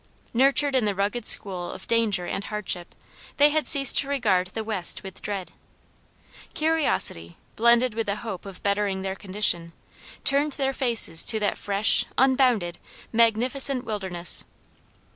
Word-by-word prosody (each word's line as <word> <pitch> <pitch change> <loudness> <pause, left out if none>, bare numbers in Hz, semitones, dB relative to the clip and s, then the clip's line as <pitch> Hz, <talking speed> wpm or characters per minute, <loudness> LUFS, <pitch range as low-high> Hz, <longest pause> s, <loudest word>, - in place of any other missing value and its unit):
Nurtured 275 +3 +2
in 255 -4 +1
the 205 -1 -1
rugged 205 +4 -2
school 185 -4 0
of - - -11
danger 220 -6 0
and 195 +3 -5
hardship, 190 -4 -5 0.4
they 290 +1 +5
had 310 0 -1
ceased 275 -3 +7
to 275 - 0
regard 210 -10 0
the 220 +4 -6
West 210 -5 -2
with 190 -1 -10
dread. 195 -3 -6 1.0
Curiosity, 300 - 0 0.2
blended 235 +1 +3
with 225 0 -4
the 200 - -1
hope 210 -3 -8
of 195 -2 -11
bettering 200 -1 -1
their 190 0 -3
condition, 185 -4 -1 0.5
turned 285 +2 0
their 270 -1 -2
faces 230 -11 +4
to 220 - +2
that 205 - -1
"fresh, 200 +1 +3
unbounded, 250 -9 +1 0.3
magnificent 245 +4 +1
wilderness." 190 -6 -2
215 Hz, 145 wpm, -24 LUFS, 190-260 Hz, 1.0 s, ceased